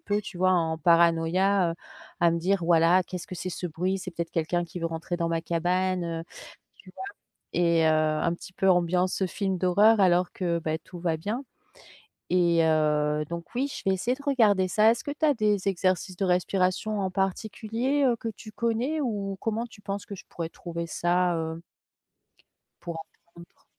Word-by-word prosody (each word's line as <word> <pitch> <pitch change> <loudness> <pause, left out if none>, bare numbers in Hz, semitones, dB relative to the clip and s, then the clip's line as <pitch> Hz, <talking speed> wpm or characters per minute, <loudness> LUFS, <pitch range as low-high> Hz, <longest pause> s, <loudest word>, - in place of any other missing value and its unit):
peu, 205 +1 -1
tu 190 -3 -9
vois, 185 +1 +3
en 165 -3 +1
paranoïa, 170 +3 +3
heu, - - -8 0.5
à 170 -1 +4
me 170 - 0
dire 185 0 +1
voilà: 170 +2 +4
«Qu'est-ce 180 -2 -7
que 185 - -6
c'est, 185 +2 -4
ce 175 0 -4
bruit? 185 +4 -1
C'est 185 - -6
peut-être 170 0 -4
quelqu'un 175 +2 0
qui 175 +1 -8
veut 165 - 0
rentrer 165 +2 -4
dans 170 -1 -1
ma 165 0 0
cabane», 180 +2 0
heu, 165 -1 -4 0.5
tu 190 - -17
vois, - - -7 0.5
et 170 -2 +3
heu, - - +5
un 155 +1 +1
petit 180 - -11
peu 190 +1 +2
ambiance, 180 +1 +1
heu, - - +3
film 190 0 -2
d'horreur 205 +5 +4
alors 180 -1 +3
que 170 -2 -1
bah 155 0 -2
tout 175 +2 -12
va 170 -2 0
bien, 215 - -4 0.9
et 170 -2 +4
heu, 150 -1 +2
donc 170 0 -7
oui, 270 +3 +1
je - - -6
vais 190 - +3
essayer 240 +7 -1
de 280 - -14
regarder 215 -9 +3
ça. 215 +3 +5
Est-ce 235 - -3
que 285 - -3
tu 295 +2 -1
as 295 - +4
des 210 -5 0
exercices 185 0 0
de 195 - -1
respiration 185 +3 0
en 190 -1 -1
particulier, 220 +8 -1
heu, 245 - +3
que 225 - -4
tu 215 0 -10
connais? 235 +8 -1
Ou 205 -6 -2
comment 225 +1 -1
tu 220 -2 -16
penses 200 0 -5
que 200 - -7
je - - -12
pourrais 165 -1 -4
trouver 170 -1 -6
ça, 175 +1 +1
heu 160 +1 -4 1.2
pour 170 -1 -5
apprendre? 170 0 -19
180 Hz, 195 wpm, -27 LUFS, 170-200 Hz, 1.2 s, heu